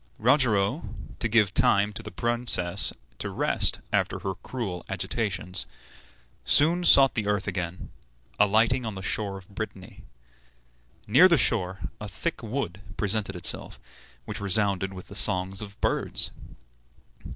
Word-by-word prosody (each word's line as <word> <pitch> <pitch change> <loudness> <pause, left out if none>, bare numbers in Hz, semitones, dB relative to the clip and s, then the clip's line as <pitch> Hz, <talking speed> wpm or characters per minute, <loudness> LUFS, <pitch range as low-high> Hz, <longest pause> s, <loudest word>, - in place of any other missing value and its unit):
Rogero, 115 -5 +1 0.3
to - - 0
give 105 -3 +2
time 100 +1 +3
to 115 - -4
the 105 - -8
princess 120 -7 +1 0.3
to - - -4
rest - - +1
after - - 0
her 95 - -4
cruel 95 -7 -6
agitations, 90 - -2 0.8
soon 170 +5 +5
sought 135 -6 +7
the 105 -3 -2
earth 105 -1 -1
again, 90 -2 -5 0.5
alighting 110 +5 +3
on 110 -3 -5
the 95 - -7
shore 100 0 -1
of 95 -2 -14
Brittany. 100 -2 -8 1.0
Near 140 - +6
the 170 -3 +3
shore 95 -4 +3 0.2
a 105 - -6
thick 165 +6 -4
wood 110 -6 -4 0.2
presented 100 -1 -1
itself, 90 - -4 0.5
which - - -5
resounded 100 -1 +1
with 90 -1 -10
the 100 - -12
songs 95 -1 0
of 100 -1 -10
birds. - - 0
105 Hz, 135 wpm, -26 LUFS, 95-115 Hz, 1.0 s, sought